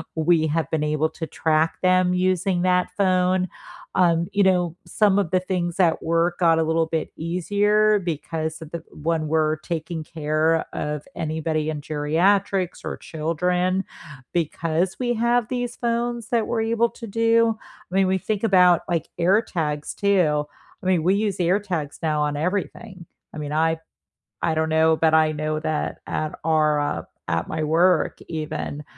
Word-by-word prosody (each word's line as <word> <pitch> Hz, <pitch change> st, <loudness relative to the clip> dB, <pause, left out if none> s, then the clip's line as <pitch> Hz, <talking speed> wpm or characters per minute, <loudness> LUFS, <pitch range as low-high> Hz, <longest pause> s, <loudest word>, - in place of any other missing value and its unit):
we 160 Hz, 0 st, +3 dB
have 165 Hz, -3 st, -1 dB
been 155 Hz, -1 st, 0 dB
able 155 Hz, +1 st, +1 dB
to 160 Hz, -, -3 dB
track 160 Hz, 0 st, +1 dB
them 185 Hz, 0 st, +4 dB, 0.3 s
using 185 Hz, 0 st, 0 dB
that 180 Hz, 0 st, +2 dB
phone, 185 Hz, -1 st, +2 dB, 0.5 s
um, 170 Hz, -2 st, +3 dB
you 205 Hz, -, +2 dB
know, 180 Hz, -3 st, +2 dB
some 205 Hz, -2 st, +2 dB
of 195 Hz, -5 st, 0 dB
the 185 Hz, -, +3 dB
things 180 Hz, -1 st, -2 dB
at 170 Hz, -3 st, +3 dB
work 170 Hz, +1 st, 0 dB
got 165 Hz, -2 st, +4 dB
a -, -, +3 dB
little 160 Hz, 0 st, +1 dB
bit 160 Hz, -1 st, -2 dB
easier 205 Hz, +5 st, +2 dB
because 160 Hz, -2 st, -4 dB
of 160 Hz, -1 st, -10 dB
the 170 Hz, -, -5 dB, 0.3 s
when 160 Hz, -2 st, 0 dB
we're 155 Hz, 0 st, +1 dB
taking 160 Hz, 0 st, -4 dB
care 155 Hz, +1 st, 0 dB
of 150 Hz, -1 st, -3 dB
anybody 155 Hz, 0 st, -2 dB
in 150 Hz, -2 st, -4 dB
geriatrics 180 Hz, +6 st, +1 dB
or -, -, -3 dB
children, 180 Hz, +4 st, -1 dB, 0.5 s
because 170 Hz, +2 st, -1 dB
we 245 Hz, -1 st, 0 dB
have 235 Hz, 0 st, +1 dB
these 245 Hz, -1 st, -2 dB
phones 235 Hz, -1 st, -2 dB
that 230 Hz, -3 st, +1 dB
we're 230 Hz, -2 st, 0 dB
able 230 Hz, +1 st, +1 dB
to 230 Hz, -, -10 dB
do. 230 Hz, +1 st, +2 dB, 0.3 s
I -, -, -4 dB
mean, 195 Hz, -1 st, +4 dB
we 190 Hz, 0 st, +2 dB
think 210 Hz, +2 st, -3 dB
about, 180 Hz, -5 st, +5 dB
like, 165 Hz, -2 st, -1 dB
AirTags, 170 Hz, -5 st, 0 dB
too. 175 Hz, -7 st, +2 dB, 0.4 s
I -, -, -12 dB
mean, 180 Hz, -4 st, +2 dB
we 185 Hz, +4 st, +3 dB
use 205 Hz, -2 st, -1 dB
AirTags 175 Hz, -4 st, -1 dB
now 155 Hz, -2 st, 0 dB
on 150 Hz, -1 st, -1 dB
everything. 185 Hz, +2 st, -3 dB, 0.3 s
I -, -, -8 dB
mean, 150 Hz, -1 st, -5 dB
I 160 Hz, +1 st, +1 dB, 0.7 s
I 165 Hz, -, +2 dB
don't 160 Hz, 0 st, 0 dB
know, 160 Hz, 0 st, +4 dB
but, 160 Hz, 0 st, +2 dB
I 155 Hz, -1 st, +4 dB
know 155 Hz, 0 st, -2 dB
that 155 Hz, -1 st, -2 dB
at 155 Hz, -1 st, -3 dB
our, 155 Hz, -1 st, +2 dB
uh, 145 Hz, -, -2 dB, 0.3 s
at 85 Hz, +1 st, -1 dB
my 155 Hz, 0 st, -3 dB
work 165 Hz, +3 st, +2 dB
even, 155 Hz, -2 st, -4 dB
170 Hz, 165 wpm, -23 LUFS, 155-190 Hz, 0.7 s, about